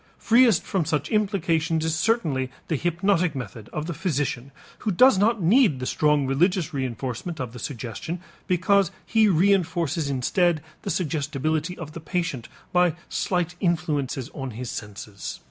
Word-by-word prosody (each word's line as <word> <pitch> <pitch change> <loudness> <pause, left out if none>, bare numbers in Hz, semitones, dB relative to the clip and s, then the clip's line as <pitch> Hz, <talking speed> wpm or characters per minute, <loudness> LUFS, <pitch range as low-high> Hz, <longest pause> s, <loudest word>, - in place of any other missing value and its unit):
Freest 230 -4 +4
from 190 -4 0
such 150 -2 -1
implications 165 -7 +1
is 160 - 0
certainly 160 - +1 0.2
the 160 - +1
hypnotic 175 +1 +1
method 120 -4 -7
of 150 - -3
the 170 - -3
physician 145 -6 -2 0.3
who - - -2
does 210 +2 +5
not 215 -1 +2
need 195 - +4
the 130 - -3
strong 150 0 +2
religious 170 +6 +1
reënforcement 130 +4 -4
of 125 -4 -4
the 125 - -8
suggestion 130 +7 -5 0.3
because 185 +2 +3 0.2
he 220 -1 +4
reënforces 175 -4 +2
instead 155 +5 +1 0.2
the - - -5
suggestibility 155 0 -1
of 155 -3 -7
the 165 - -7
patient 160 -6 -3 0.2
by 180 -3 +3
slight 175 -2 -1
influences 150 -7 -1
on 135 -2 -5
his 125 -1 -4
senses. 105 -1 -7
160 Hz, 145 wpm, -25 LUFS, 140-180 Hz, 0.3 s, does